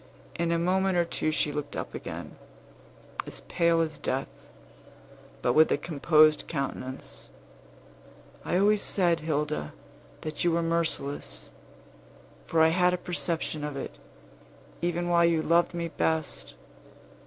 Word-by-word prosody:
In 170 0 -1
a 170 - +2
moment 185 +2 +2
or 170 - +3
two 160 - -1
she 155 -1 +1
looked 145 0 -5
up - - -5
again, - - -7 0.9
as - - -6
pale 170 -1 +2
as 155 -2 -3
death, 135 -2 -2 1.1
but 120 - +3
with 155 +3 +5
a - - +3
composed 155 0 +4
countenance: 135 -3 -5 1.1
"I 180 - 0
always 205 +2 +4
said, 175 -4 +1
Hilda, 150 - -2 0.5
that 155 0 -3
you 175 -1 +3
were 170 0 +1
merciless; 160 - -2 1.0
for 165 - +2
I 160 - +7
had 180 +2 +3
a - - -4
perception 170 -3 -2
of 150 -2 -4
it, - - -6 0.9
even 175 0 -1
while 170 -1 +4
you 165 -2 +2
loved 170 +1 +3
me 170 -1 -2
best. 160 -1 -2
165 Hz, 135 wpm, -28 LUFS, 150-175 Hz, 1.1 s, I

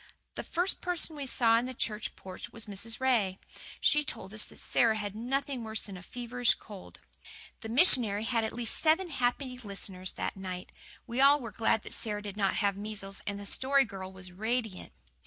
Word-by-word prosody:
The - - -4
first 355 +3 -1
person 350 -3 0
we 285 -2 -5
saw 230 -2 +4
in 245 - -3
the 255 - -6
church 215 -2 -2
porch 185 -1 -7
was 230 -2 -9
Mrs. 220 +2 -3
Ray. 230 -8 +2 0.4
She 300 0 +4
told 190 -7 -4
us 215 - 0
that - - -12
Sara 225 -3 +2
had 205 -1 -4
nothing 260 +2 -2
worse 220 -1 -3
than 200 - -8
a 180 - -9
feverish 245 +4 +1
cold. 205 -4 -12 0.6
The 225 - -7
missionary 230 - +5
had 230 -1 +1
at 220 - -1
least 235 -1 -1
seven 330 +3 +3
happy 250 0 -1
listeners 195 -4 -1
that - - -3
night. 185 -1 -6 0.3
We 235 - -6
were 265 - +5
all 280 -5 +4
glad 220 +1 +1
that - - -7
Sara 210 -2 -2
did 200 -1 -6
not 195 -2 +1
have 200 -2 +1
measles, 200 -1 -4
and 200 -1 -3
the 200 - -8
Story 270 +6 +4
Girl 190 -3 -7
was 185 -1 -12
radiant. 220 +1 -2
225 Hz, 195 wpm, -30 LUFS, 200-255 Hz, 0.6 s, missionary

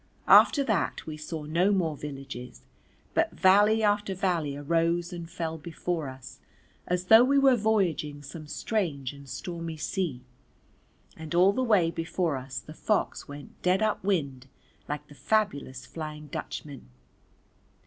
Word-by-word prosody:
After 280 - +7
that 220 -9 -1
we 155 - -6
saw 155 +1 -6
no 170 +6 +2
more 170 -6 +1
villages, 135 -3 -8 0.5
but - - +2
valley 205 +4 +5
after 205 -1 +1
valley 170 -7 -1
arose 170 +4 0
and 170 -1 -7
fell 165 -2 -4
before 165 -1 -3
us 130 -1 -11 0.5
as 180 0 -1
though 220 +5 +8
we 275 +2 +3
were 270 -2 +6
voyaging 180 -10 0
some 155 +2 -9
strange 150 - -2
and 140 -1 -13
stormy 165 +4 -5
sea, 150 -6 -3 0.9
and 160 +1 -6
all 185 +3 +5
the 260 - -1
way 205 -9 +3
before 165 -1 -1
us 130 0 -5
the 155 - -11
fox 210 +6 -1
went 145 0 -11
dead 185 +3 +2
up 215 -3 0
wind 140 -10 -1 0.4
like 150 0 -4
the - - -14
fabulous 145 - -1
Flying 155 -2 -7
Dutchman. 140 - -7
165 Hz, 145 wpm, -28 LUFS, 145-195 Hz, 0.9 s, though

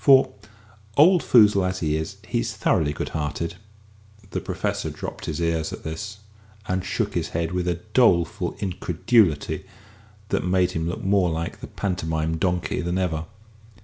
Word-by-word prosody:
For, 135 -2 +6 0.7
old 175 +4 +7
foozle 105 -5 +5
as 90 0 -2
he 75 -2 +1
is, 80 0 -4
he's - - -1
thoroughly 75 -2 +2
good 75 - -4
hearted." 80 +3 -3 0.7
The - - -2
Professor - - -2
drooped - - -7
his 75 - -3
ears 85 -1 0
at - - -8
this, 100 +6 -5 0.5
and 95 0 0
shook - - -1
his - - -1
head 85 -1 -1
with 90 0 -1
a 85 -1 -1
doleful 85 -10 +3
incredulity 90 -1 +1 0.7
that - - 0
made 90 0 +2
him 80 -1 -2
look 90 - -5
more 95 -2 +3
like 80 +1 -3
the - - -8
Pantomime 80 -4 -2
Donkey 90 -1 0
than 85 +1 -1
ever. 85 -4 -1
90 Hz, 155 wpm, -24 LUFS, 80-95 Hz, 0.7 s, old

